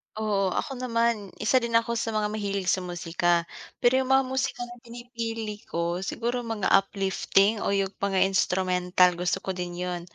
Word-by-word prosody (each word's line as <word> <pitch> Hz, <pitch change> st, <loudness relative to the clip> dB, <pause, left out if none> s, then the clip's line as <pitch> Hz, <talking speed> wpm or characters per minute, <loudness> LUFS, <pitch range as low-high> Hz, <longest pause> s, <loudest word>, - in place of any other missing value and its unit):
Oo, 210 Hz, -3 st, 0 dB
ako 265 Hz, -3 st, -3 dB
naman, 230 Hz, -4 st, 0 dB
1 255 Hz, +4 st, +3 dB
din 235 Hz, -1 st, -2 dB
ako 230 Hz, 0 st, +3 dB
sa 225 Hz, -, -2 dB
mga 210 Hz, 0 st, 0 dB
mahilig 200 Hz, -3 st, -2 dB
sa 185 Hz, -, +1 dB
musika. 175 Hz, -1 st, 0 dB, 0.4 s
Pero 255 Hz, +2 st, +5 dB
yung 260 Hz, -, -4 dB
mga 270 Hz, 0 st, +5 dB
musika 255 Hz, -1 st, -2 dB
na 240 Hz, 0 st, -9 dB
pinipili 230 Hz, -3 st, -6 dB
ko 170 Hz, +1 st, -2 dB
siguro 235 Hz, +5 st, -2 dB
mga 225 Hz, -4 st, -1 dB
uplifting 195 Hz, +2 st, +2 dB
o -, -, 0 dB
yung 195 Hz, -1 st, 0 dB
mga 195 Hz, -1 st, +2 dB
instrumental, 180 Hz, -1 st, +2 dB
gusto 180 Hz, +2 st, -1 dB
ko 190 Hz, -, -2 dB
din 180 Hz, -1 st, -5 dB
yun. 180 Hz, -1 st, -3 dB
205 Hz, 170 wpm, -26 LUFS, 185-235 Hz, 0.4 s, Pero